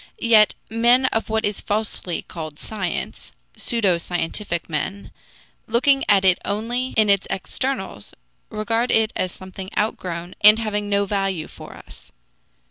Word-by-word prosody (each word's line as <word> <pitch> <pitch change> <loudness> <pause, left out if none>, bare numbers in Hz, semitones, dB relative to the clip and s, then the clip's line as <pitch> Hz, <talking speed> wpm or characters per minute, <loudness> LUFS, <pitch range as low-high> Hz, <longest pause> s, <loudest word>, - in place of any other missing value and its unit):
Yet 220 -2 +5
men 240 +4 +4
of 225 - -1
what 220 0 0
is 205 -1 -2
falsely 205 -4 -2
called 155 -3 -8
science, 190 -3 -4 0.2
pseudo 200 -7 +1
scientific 175 +1 -2
men, 170 +6 -4 0.6
looking 270 +4 +3
at 195 -2 +4
it 185 -1 +4
only 240 +5 -2
in 215 -1 +5
its 200 -1 +3
externals, 195 - -3 0.3
regard 225 +3 -1
it 220 -1 +2
as 185 - -1
something 190 +1 -9
outgrown 180 -4 -2
and 210 +1 +9
having 210 -2 -2
no 200 0 +2
value 195 -5 -1
for - - -12
us. - - -13
205 Hz, 135 wpm, -22 LUFS, 185-225 Hz, 0.6 s, and